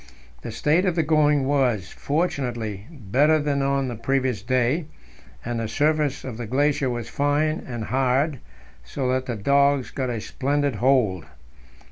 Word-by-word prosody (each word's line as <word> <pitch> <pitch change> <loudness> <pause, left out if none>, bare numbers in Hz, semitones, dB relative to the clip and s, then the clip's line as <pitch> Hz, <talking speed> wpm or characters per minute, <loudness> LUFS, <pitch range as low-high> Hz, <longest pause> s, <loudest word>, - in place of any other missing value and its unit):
The - - -6
state 160 +6 +2
of 180 -3 +1
the 165 - +2
going 150 -2 +3
was, 125 - +1
fortunately, 120 - -2
better 145 - +2
than 145 -2 0
on 135 -1 0
the 125 - -3
previous 130 -1 -1
day, 130 - 0 0.6
and 120 0 -2
the 115 - -2
surface 150 +2 0
of 125 -4 -6
the 120 -2 -5
glacier 140 +2 +1
was 120 -2 -4
fine 145 +5 0
and 120 -3 -5
hard, 135 +4 +1 0.4
so 130 - -3
that 130 0 -1
the 120 - -2
dogs 140 +2 +2
got 130 -2 -3
a 120 -2 -2
splendid 140 +2 -1
hold. 115 - +2
135 Hz, 155 wpm, -24 LUFS, 120-145 Hz, 0.6 s, going